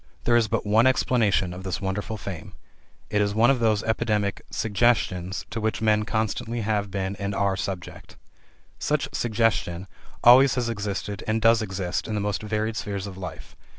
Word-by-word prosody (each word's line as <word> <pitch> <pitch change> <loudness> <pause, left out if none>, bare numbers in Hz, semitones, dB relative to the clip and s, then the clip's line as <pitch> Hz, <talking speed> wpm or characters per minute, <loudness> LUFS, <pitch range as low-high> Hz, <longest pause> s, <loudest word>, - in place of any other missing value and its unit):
There 120 - +3
is 115 -2 +4
but 110 0 -1
one 110 +4 +4
explanation 115 -8 +2
of 90 - -8
this 95 -1 -3
wonderful 100 +3 -3
fame: 95 -5 -7 0.6
it 105 - +2
is 100 0 0
one 115 +4 +5
of 135 - +1
those 110 -3 +2
epidemic 105 -3 0
"suggestions" 100 -4 0
to 115 - -3
which 110 0 -1
men 105 -1 +2
constantly 110 +1 -2
have 105 -1 -1
been 95 0 -3
and 100 0 -3
are 100 -1 +1
subject. 95 -2 -6 0.6
Such - - 0
"suggestion" 110 -6 0 0.4
always 130 +3 +7
has 120 -2 -1
existed 105 -1 -4
and 110 +1 +1
does 115 0 +4
exist 95 -3 -3
in 110 - -3
the - - 0
most 105 0 -2
varied 110 +1 -2
spheres 100 -3 -4
of 100 -2 -7
life. 95 -1 -8
105 Hz, 175 wpm, -25 LUFS, 100-115 Hz, 0.6 s, always